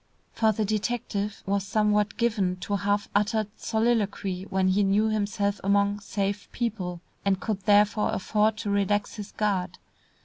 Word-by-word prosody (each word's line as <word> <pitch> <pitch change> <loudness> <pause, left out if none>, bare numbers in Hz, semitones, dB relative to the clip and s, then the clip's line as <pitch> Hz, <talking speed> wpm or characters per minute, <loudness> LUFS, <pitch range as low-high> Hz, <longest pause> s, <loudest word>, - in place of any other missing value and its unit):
For 220 -1 +3
the 215 0 -1
detective 210 -1 -2
was 200 0 0
somewhat 210 +1 +1
given 210 -6 +1
to 205 - -1
half 205 +1 0
uttered 210 +1 +1
soliloquy 210 -5 -1
when 190 0 +2
he 195 +2 +3
knew 205 +2 +3
himself 205 -1 -1
among 200 +1 +2
"safe" 200 0 -3
people, 190 -8 -3 0.2
and 195 -1 +1
could 210 -2 -2
therefore 210 +1 +4
afford 215 +3 +1
to 215 -2 -3
relax 200 +2 0
his 210 -1 -7
guard. 190 -4 -1
205 Hz, 145 wpm, -26 LUFS, 195-215 Hz, 0.2 s, therefore